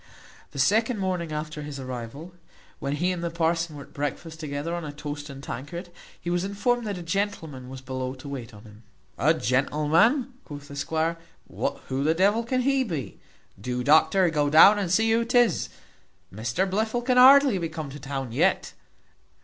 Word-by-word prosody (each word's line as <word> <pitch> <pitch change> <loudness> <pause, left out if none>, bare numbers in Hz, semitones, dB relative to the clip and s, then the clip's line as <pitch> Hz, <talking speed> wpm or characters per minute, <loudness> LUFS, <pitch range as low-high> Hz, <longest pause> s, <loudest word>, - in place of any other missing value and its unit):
The 145 - -12
second 220 - +2
morning 180 -4 -2
after 150 0 -4
his 145 -2 -7
arrival, 130 +6 -7 0.5
while 140 -1 -2
he 175 +5 0
and 175 -2 -4
the 170 - -1
parson 165 -1 -1
were 140 - -8
at - - -20
breakfast 145 +3 -4
together 150 +1 -4
on 175 0 -3
a 150 - -5
toast 145 0 -7
and 135 0 -9
tankard, 155 +10 -7 0.3
he 175 - -4
was 175 0 0
informed 220 +4 0
that 200 -2 -3
a 175 - -7
gentleman 165 -8 -3
was 130 0 -8
below 130 0 -4
to 130 +2 -11
wait 130 -4 -6
on 105 -1 -14
him. 105 -1 -15 0.4
"A 155 +8 +4
gentleman!" 155 - +2
quoth 145 -2 -10
the 140 - -8
squire, 160 +3 -1 0.3
"who 130 +1 -3
the 160 +2 +2
devil 205 +6 +3
can 255 +2 0
he 270 +1 +2
be? 160 - -5 0.4
Do, 125 +2 -3
doctor, 165 +5 +4
go 145 -2 +1
down 195 +8 +8
and 190 -4 -2
see 225 +5 +3
who 230 +1 +3
'tis. 240 0 +2 0.6
Mr 120 - -1
Blifil 220 +5 -1
can 250 0 +2
hardly 265 -4 +7
be 165 -2 -3
come 155 -3 -6
to 145 - -9
town 135 -3 -5
yet. 115 - +1
160 Hz, 185 wpm, -26 LUFS, 140-195 Hz, 0.6 s, down